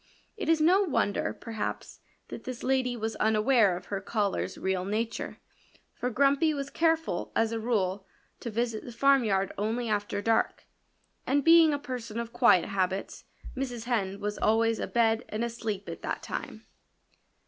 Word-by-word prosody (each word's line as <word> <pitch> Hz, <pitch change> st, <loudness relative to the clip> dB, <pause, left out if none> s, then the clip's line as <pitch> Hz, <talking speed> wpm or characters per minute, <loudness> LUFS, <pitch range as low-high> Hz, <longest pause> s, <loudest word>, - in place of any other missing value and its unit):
It 410 Hz, -7 st, -4 dB
is 325 Hz, -1 st, +4 dB
no 355 Hz, +6 st, +5 dB
wonder, 295 Hz, -, 0 dB
perhaps, 225 Hz, -2 st, -5 dB, 0.3 s
that -, -, -8 dB
this 255 Hz, -2 st, -6 dB
lady 255 Hz, -2 st, +1 dB
was 220 Hz, 0 st, -3 dB
unaware 220 Hz, -3 st, +3 dB
of 180 Hz, -, -11 dB
her 195 Hz, -, -1 dB
caller's 200 Hz, -2 st, -1 dB
real 190 Hz, -1 st, -1 dB
nature. 215 Hz, +4 st, -3 dB, 0.6 s
For 250 Hz, -, -3 dB
Grumpy 280 Hz, +5 st, +3 dB
was 280 Hz, 0 st, -4 dB
careful, 325 Hz, -, 0 dB
as 225 Hz, 0 st, +2 dB
a 230 Hz, -, -2 dB
rule, 200 Hz, -4 st, -1 dB, 0.3 s
to 235 Hz, -, -5 dB
visit 230 Hz, 0 st, -2 dB
the 245 Hz, -, -8 dB
farmyard 235 Hz, -7 st, +3 dB
only 225 Hz, +3 st, -1 dB
after 205 Hz, -1 st, -1 dB
dark. 225 Hz, +2 st, +1 dB, 0.6 s
And 280 Hz, +1 st, +2 dB
being 330 Hz, 0 st, +7 dB
a 290 Hz, -, 0 dB
person 245 Hz, -5 st, -5 dB
of 235 Hz, 0 st, -5 dB
quiet 180 Hz, -, +5 dB
habits 190 Hz, 0 st, -2 dB, 0.3 s
Mrs. 250 Hz, -3 st, -4 dB
Hen 200 Hz, -5 st, -1 dB
was 205 Hz, 0 st, -3 dB
always 225 Hz, +1 st, +2 dB
abed 225 Hz, -1 st, +1 dB
and 215 Hz, +2 st, -2 dB
asleep 225 Hz, -4 st, -4 dB
at -, -, -7 dB
that -, -, -4 dB
time. -, -, -6 dB
230 Hz, 160 wpm, -28 LUFS, 205-260 Hz, 0.6 s, being